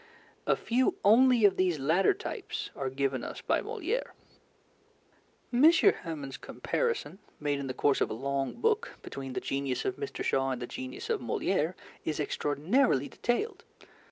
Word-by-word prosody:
A -, -, +4 dB
few 250 Hz, +2 st, +1 dB
only 240 Hz, +1 st, +6 dB
of 195 Hz, -2 st, +4 dB
these 180 Hz, -3 st, +2 dB
latter 160 Hz, +7 st, +3 dB
types -, -, -5 dB
are 135 Hz, -1 st, -2 dB
given 135 Hz, -1 st, -1 dB
us -, -, -6 dB
by -, -, +1 dB
Molière. 440 Hz, +2 st, -3 dB, 1.4 s
M. 285 Hz, +7 st, +7 dB
Hamon's 160 Hz, -, +1 dB
comparison, 465 Hz, -, -2 dB, 0.2 s
made 145 Hz, -1 st, 0 dB
in 140 Hz, -, -4 dB
the 130 Hz, -, -3 dB
course 140 Hz, -1 st, +2 dB
of -, -, +2 dB
a -, -, -3 dB
long 135 Hz, +2 st, -2 dB
book, 450 Hz, +1 st, 0 dB
between 135 Hz, -1 st, -6 dB
the -, -, -1 dB
genius 135 Hz, -2 st, -2 dB
of 385 Hz, -, -1 dB
Mr. 420 Hz, -1 st, -4 dB
Shaw 135 Hz, 0 st, +1 dB
and 130 Hz, -2 st, -2 dB
the 120 Hz, -, -4 dB
genius 130 Hz, +1 st, -6 dB
of -, -, 0 dB
Molière 160 Hz, -, 0 dB, 0.3 s
is 155 Hz, -, -2 dB
extraordinarily 150 Hz, -, +1 dB
detailed. 245 Hz, -, -2 dB
155 Hz, 155 wpm, -30 LUFS, -, 1.4 s, M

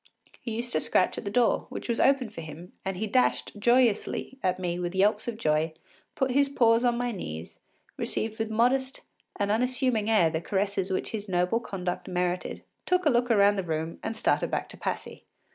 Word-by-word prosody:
He 230 Hz, -3 st, -5 dB
used 240 Hz, +1 st, -2 dB
to 155 Hz, -, +3 dB
scratch 185 Hz, -, +1 dB
at -, -, -9 dB
the -, -, -1 dB
door, 235 Hz, +3 st, +2 dB
which -, -, -6 dB
was 235 Hz, -1 st, 0 dB
opened 260 Hz, -5 st, +3 dB
for 165 Hz, -, -7 dB
him, 160 Hz, +3 st, -10 dB
and 190 Hz, -1 st, -3 dB
he 215 Hz, -, -1 dB
dashed 250 Hz, +4 st, +1 dB
joyously 240 Hz, +2 st, +2 dB
at 185 Hz, -4 st, +1 dB
me 175 Hz, -1 st, -2 dB
with 175 Hz, +1 st, -3 dB
yelps 205 Hz, +3 st, +2 dB
of 235 Hz, -2 st, -3 dB
joy, 155 Hz, -4 st, +1 dB, 0.4 s
put 265 Hz, -1 st, 0 dB
his 280 Hz, +2 st, +3 dB
paws 230 Hz, -3 st, +3 dB
on 240 Hz, -1 st, +2 dB
my 245 Hz, 0 st, -1 dB
knees, 80 Hz, -, -7 dB, 0.4 s
received 220 Hz, 0 st, -3 dB
with 225 Hz, 0 st, -1 dB
a -, -, -5 dB
modest 260 Hz, +3 st, +1 dB, 0.3 s
and 205 Hz, -1 st, 0 dB
unassuming 250 Hz, -1 st, +1 dB
air 180 Hz, -8 st, +4 dB
the 160 Hz, 0 st, -2 dB
caresses 195 Hz, +1 st, -1 dB, 0.2 s
his 210 Hz, -2 st, -5 dB
noble 180 Hz, +5 st, +1 dB
conduct 185 Hz, -6 st, -4 dB
merited, 180 Hz, -1 st, -2 dB, 0.2 s
took 365 Hz, -1 st, +2 dB
a 300 Hz, -, +5 dB
look 245 Hz, 0 st, +2 dB
round 205 Hz, -2 st, +4 dB
the -, -, -1 dB
room, 160 Hz, -1 st, -3 dB
and 225 Hz, -, -4 dB
started -, -, +1 dB
back -, -, -2 dB
to -, -, -11 dB
Passy. -, -, -5 dB
210 Hz, 200 wpm, -27 LUFS, 180-240 Hz, 0.4 s, a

